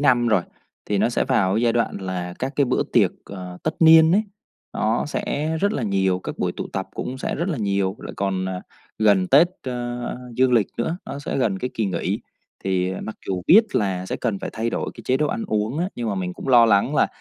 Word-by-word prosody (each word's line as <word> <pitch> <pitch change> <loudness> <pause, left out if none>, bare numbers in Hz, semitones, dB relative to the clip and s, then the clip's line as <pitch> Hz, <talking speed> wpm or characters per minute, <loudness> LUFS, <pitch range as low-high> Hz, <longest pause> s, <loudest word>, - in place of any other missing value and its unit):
năm 125 -4 +3
rồi, 105 -6 +3 0.4
thì 105 - -1
nó - - +3
sẽ 120 - 0
vào 100 -8 +2
cái 110 - +1
giai 120 -1 +3
đoạn 115 -1 0
là 90 -2 -4
các 130 +2 -3
cái 145 - +4
bữa 125 - +1
tiệc, - - +4
ờ, 90 -2 -8
tất - - -1
niên 160 0 +7
ấy 205 +4 +4 0.5
nó 110 +2 0
sẽ 150 +2 -2
rất 200 +1 +2
là 140 - -2
nhiều, 95 -3 +1
các - - -7
buổi - - 0
tụ - - -4
tập - - -3
cũng 130 +1 -4
sẽ - - -2
rất 170 +5 -2
là 165 - -2
nhiều, 100 -2 0
lại - - -8
còn, 95 -1 -1
à, 90 -1 -4 0.4
gần 100 -4 +4
Tết, 150 +6 +6
ơ, 120 -1 -4 0.2
dương 130 0 +3
lịch 115 -5 +4
nữa, 160 +8 -1
nó 140 - -5
sẽ 145 - -4
gần 100 -7 +1
cái 125 - -3
kỳ 110 - 0
nghỉ. 90 -3 -2 0.4
Thì, 95 -1 0
à, 95 - -5
mặc 110 - -6
dù 95 -2 -2
biết 215 +6 +8
là 95 -3 0
sẽ - - -3
cần 100 -3 -2
phải - - -5
thay 115 +1 -2
đổi - - -2
cái - - -11
chế 130 - +2
độ 150 +2 +1
ăn 230 +4 -3
uống 110 - -1
á, 175 +2 0
nhưng 120 -2 -3
mà 105 - -1
mình 90 -2 -3
cũng - - -8
lo 120 -3 +7
lắng 110 +6 +3
là - - +4
115 Hz, 250 wpm, -23 LUFS, 95-135 Hz, 0.5 s, biết